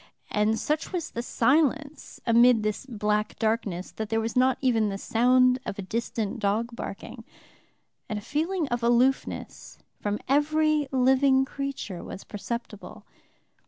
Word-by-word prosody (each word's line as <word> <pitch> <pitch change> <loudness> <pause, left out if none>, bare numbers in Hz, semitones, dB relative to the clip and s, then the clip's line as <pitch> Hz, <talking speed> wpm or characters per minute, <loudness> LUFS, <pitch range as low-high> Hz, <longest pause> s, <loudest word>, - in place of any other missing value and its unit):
And 210 +1 +2
such 300 +5 -2
was 345 -3 -3
the 235 - -3
silence 290 +4 0
amid 235 -1 +5
this 215 +5 -3
black 210 -3 -1
darkness, 215 -5 -1
that 220 -1 -5
there 225 - +1
was 225 0 -3
not 255 0 +3
even 225 -5 +2
the 195 - -3
sound 250 +4 +3
of - - -5
a 200 - -4
distant 220 +1 -3
dog 225 +4 -1
barking, - - -7 0.9
and 215 - -2
a - - -5
feeling 320 - -1
of 240 0 -1
aloofness 240 +3 0 0.2
from 205 0 -2
every 305 +1 +2
living 265 +1 +4
creature 270 -10 -5
was 195 - -8
perceptible. 220 0 -7
240 Hz, 140 wpm, -26 LUFS, 215-270 Hz, 0.9 s, amid